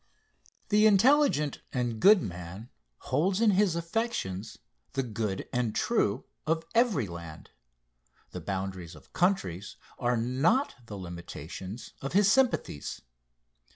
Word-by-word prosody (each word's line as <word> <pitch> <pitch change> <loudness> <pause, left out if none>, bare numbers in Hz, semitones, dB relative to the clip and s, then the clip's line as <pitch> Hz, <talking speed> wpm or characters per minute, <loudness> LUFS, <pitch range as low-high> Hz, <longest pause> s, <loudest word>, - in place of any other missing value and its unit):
The 210 +1 +5
intelligent 215 - +4
and 120 -3 -2
good 200 - +7
man 90 +4 -7 0.3
holds 180 +9 0
in 225 -2 +5
his 195 -3 +3
affections 170 - -3 0.4
the 135 0 0
good 105 -4 -3
and 120 -3 0
true 125 - +1 0.2
of 165 +1 0
every 230 - +3
land 85 -3 -9 0.8
the - - -6
boundaries 95 -3 -4
of - - -18
countries 100 - 0 0.2
are 120 -1 +1
not 135 - +2
the 105 - -7
limitations 90 +3 -8
of 135 - -4
his 200 +1 +5
sympathies. 250 - 0
125 Hz, 120 wpm, -29 LUFS, -, 0.8 s, good